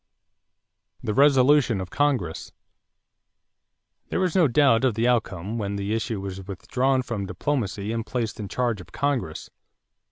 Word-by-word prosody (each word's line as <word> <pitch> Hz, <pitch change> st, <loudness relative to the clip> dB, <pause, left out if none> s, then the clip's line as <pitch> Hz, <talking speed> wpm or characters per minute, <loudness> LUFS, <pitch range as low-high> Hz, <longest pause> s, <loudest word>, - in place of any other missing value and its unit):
=The 105 Hz, -, -1 dB
Resolution 135 Hz, -3 st, +4 dB
of 95 Hz, -1 st, -6 dB
Congress.= 130 Hz, -, -1 dB, 1.6 s
There -, -, -1 dB
was 185 Hz, -2 st, 0 dB
no 175 Hz, -5 st, +5 dB
doubt 130 Hz, -2 st, +4 dB
of 125 Hz, -5 st, +2 dB
the 115 Hz, +2 st, +1 dB
outcome 110 Hz, -3 st, -1 dB
when 100 Hz, -1 st, -2 dB
the 100 Hz, +1 st, -2 dB
issue 115 Hz, -1 st, -2 dB
was 95 Hz, -1 st, -6 dB
withdrawn 130 Hz, +7 st, 0 dB
from 105 Hz, -5 st, -4 dB
diplomacy 105 Hz, 0 st, -2 dB
and 115 Hz, 0 st, -2 dB
placed 115 Hz, -2 st, -3 dB
in 105 Hz, -, -4 dB
charge 120 Hz, -3 st, -1 dB
of 85 Hz, -1 st, -15 dB
Congress. 135 Hz, -, -2 dB
115 Hz, 140 wpm, -25 LUFS, 100-135 Hz, 1.6 s, no